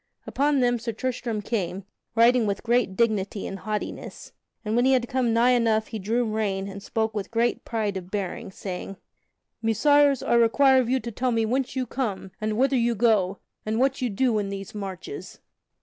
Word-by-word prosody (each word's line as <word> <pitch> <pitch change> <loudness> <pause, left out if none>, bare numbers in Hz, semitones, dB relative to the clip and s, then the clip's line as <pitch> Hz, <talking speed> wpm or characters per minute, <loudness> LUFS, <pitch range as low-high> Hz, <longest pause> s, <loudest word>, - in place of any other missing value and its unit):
Unto 285 0 +1
them 245 -1 +2
Sir 230 0 -4
Tristram 230 -2 -3
came, 195 -3 -2 0.3
riding 235 0 +5
with 200 -1 -2
great 240 -5 +1
dignity 205 -2 0
and 195 - -5
haughtiness, 215 -1 -5 0.3
and 215 +1 -1
when 240 - +3
he 265 +1 +4
had 245 -2 +2
come 250 -2 0
nigh 235 +2 +4
enough 225 -3 +2
he 220 - -5
drew 230 +5 0
rein 205 -3 -1
and 200 0 -8
spoke 220 +1 -1
with 205 -3 -4
great 235 +1 0
pride 215 -3 -2
of 185 -1 -6
bearing, 195 -3 -4
saying: 190 0 -6 0.6
"Messires, 280 +5 +3
I - - +2
require 260 +3 +5
of 240 - -3
you 260 +1 +2
to 235 0 -6
tell 250 +3 -1
me 225 -1 +1
whence 255 +4 -1
you 260 -1 -1
come, 215 -7 -3
and 215 0 -1
whither 270 +2 +3
you 235 0 +1
go, 200 -4 +2 0.2
and 215 +1 -2
what 270 +2 +1
you 250 - 0
do 225 +1 +1
in 200 -1 -2
these 195 -1 -6
marches?" 200 - -7
225 Hz, 195 wpm, -25 LUFS, 205-250 Hz, 0.6 s, riding